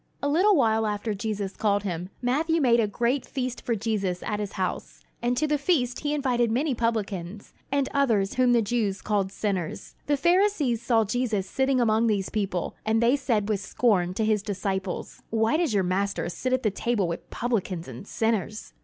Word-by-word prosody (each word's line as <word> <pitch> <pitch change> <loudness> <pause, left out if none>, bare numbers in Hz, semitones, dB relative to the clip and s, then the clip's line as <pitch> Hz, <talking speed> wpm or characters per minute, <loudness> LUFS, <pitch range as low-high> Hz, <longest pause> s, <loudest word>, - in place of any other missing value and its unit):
A - - +2
little 370 +8 +4
while 220 -5 +3
after 210 +1 -2
Jesus 205 -1 -3
called 205 -2 +1
him, 180 -2 -4
Matthew 315 +7 +1
made 240 -5 +4
a 220 - +3
great 240 +5 0
feast 255 -2 -4
for 235 - 0
Jesus 195 -4 -2
at 210 -1 -2
his 205 -2 -4
house; 185 -1 -4 0.2
and 245 +1 0
to 310 - +2
the 300 -1 +1
feast 265 -6 +1
he 295 0 -1
invited 245 -5 +1
many 265 +6 +1
publicans, 210 -5 -3 0.2
and 280 -1 +1
others 225 -9 +2
whom 255 -1 +3
the 235 -2 +4
Jews 205 -3 -1
called 200 -3 -1
sinners. 195 -5 -3
The 290 0 +2
Pharisees 345 - +2
saw 230 -1 +3
Jesus 215 -3 -1
sitting 265 +5 +1
among 225 -1 +3
these 200 -3 0
people, 195 -5 -2
and 220 +1 +2
they 235 +3 +4
said 230 -7 0
with 210 -2 0
scorn 190 -3 +1
to 220 - 0
his 215 -1 +2
disciples: 195 -2 -4
"Why 225 +4 +2
does 335 -5 +1
your 200 -3 +2
Master 190 0 -1
sit 255 +8 -3
at 255 0 +1
the 215 - +2
table 210 -2 0
with 170 - -5
publicans 195 -8 -2
and 130 - -9
sinners?" 220 -1 -2
220 Hz, 190 wpm, -26 LUFS, 200-250 Hz, 0.2 s, little